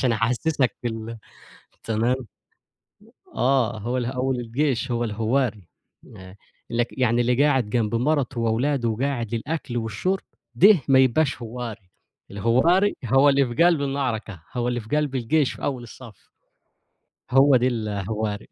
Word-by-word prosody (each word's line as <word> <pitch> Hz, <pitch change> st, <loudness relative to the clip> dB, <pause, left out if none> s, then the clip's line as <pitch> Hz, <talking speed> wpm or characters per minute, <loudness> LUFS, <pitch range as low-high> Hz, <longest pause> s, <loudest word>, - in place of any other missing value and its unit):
عشان 125 Hz, -3 st, +2 dB
أحسّسك 125 Hz, +4 st, 0 dB
في 120 Hz, -, -1 dB
ال 115 Hz, 0 st, -6 dB, 0.7 s
تمام، 115 Hz, +3 st, 0 dB, 1.2 s
آه 120 Hz, -2 st, +1 dB
هو 120 Hz, +4 st, -2 dB
ال 125 Hz, -, -1 dB
أول 130 Hz, +1 st, -1 dB
الجيش 125 Hz, +1 st, -1 dB
هو 120 Hz, 0 st, 0 dB
الهوّاري، 110 Hz, -2 st, -1 dB, 0.5 s
آآ 95 Hz, 0 st, -12 dB, 0.3 s
لك 120 Hz, 0 st, -2 dB
يعني 120 Hz, -1 st, +2 dB
اللي 125 Hz, +3 st, +2 dB
قاعد 130 Hz, -7 st, +1 dB
جنب 115 Hz, 0 st, 0 dB
مَرَته 130 Hz, -1 st, 0 dB
وأولاده 120 Hz, +2 st, 0 dB
وقاعد 120 Hz, -1 st, -2 dB
للأكل 125 Hz, 0 st, -4 dB
والشرب، 115 Hz, -, -2 dB, 0.3 s
ده 195 Hz, -5 st, +6 dB
ما 135 Hz, -1 st, +5 dB
يبقاش 130 Hz, +1 st, +2 dB
هوّاري، 115 Hz, -5 st, -7 dB, 0.4 s
الهوّاري 130 Hz, -, +2 dB
هو 135 Hz, +5 st, +5 dB
اللي 140 Hz, -1 st, +3 dB
في 170 Hz, -, +4 dB
قلب 170 Hz, -4 st, +4 dB
المعركة، 120 Hz, -, -3 dB
هو 120 Hz, -1 st, -1 dB
اللي 120 Hz, 0 st, -1 dB
في 115 Hz, +7 st, -2 dB
قلب 150 Hz, -3 st, -1 dB
الجيش 135 Hz, +3 st, +1 dB
في -, -, -13 dB
أول 130 Hz, -4 st, -2 dB
الصف. 115 Hz, -3 st, -14 dB, 1.0 s
هو 135 Hz, +1 st, +5 dB
ده 125 Hz, -, +2 dB
الهوّاري. 105 Hz, -2 st, -3 dB
120 Hz, 145 wpm, -23 LUFS, 115-135 Hz, 1.2 s, ده